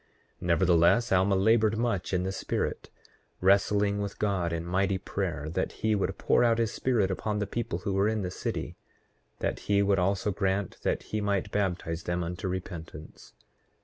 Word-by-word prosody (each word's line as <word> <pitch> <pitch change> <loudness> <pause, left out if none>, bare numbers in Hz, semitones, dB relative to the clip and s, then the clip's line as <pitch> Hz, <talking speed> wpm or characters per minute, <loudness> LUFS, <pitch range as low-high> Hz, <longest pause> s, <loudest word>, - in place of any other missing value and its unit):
8:10 - - -38
Nevertheless 90 +6 +4
Alma 95 +1 +3
labored 110 +2 +3
much 115 -5 -1
in 90 -1 +1
the 95 - -2
spirit, 95 - -3 0.5
wrestling 100 +2 +3
with 100 -1 -4
God 95 -5 0
in 85 0 -3
mighty 95 +2 +1
prayer, 90 -6 -3
that - - -2
he 110 0 0
would 100 -2 -1
pour - - +3
out 115 -1 +3
his 115 -1 0
Spirit 110 -7 +1
upon 105 +3 -2
the 105 - 0
people 100 -4 -3
who 100 +2 -3
were 100 +2 +2
in 110 -2 0
the 90 - -3
city; - - -4 0.6
that - - -1
he 100 0 +4
would 100 -1 +2
also 95 +2 +1
grant 95 0 -1
that - - -1
he 105 - 0
might 100 -2 -1
baptize 90 -4 -1
them 85 +1 -2
unto 90 +4 -4
repentance. 85 -4 -7
95 Hz, 180 wpm, -28 LUFS, 90-105 Hz, 0.6 s, Nevertheless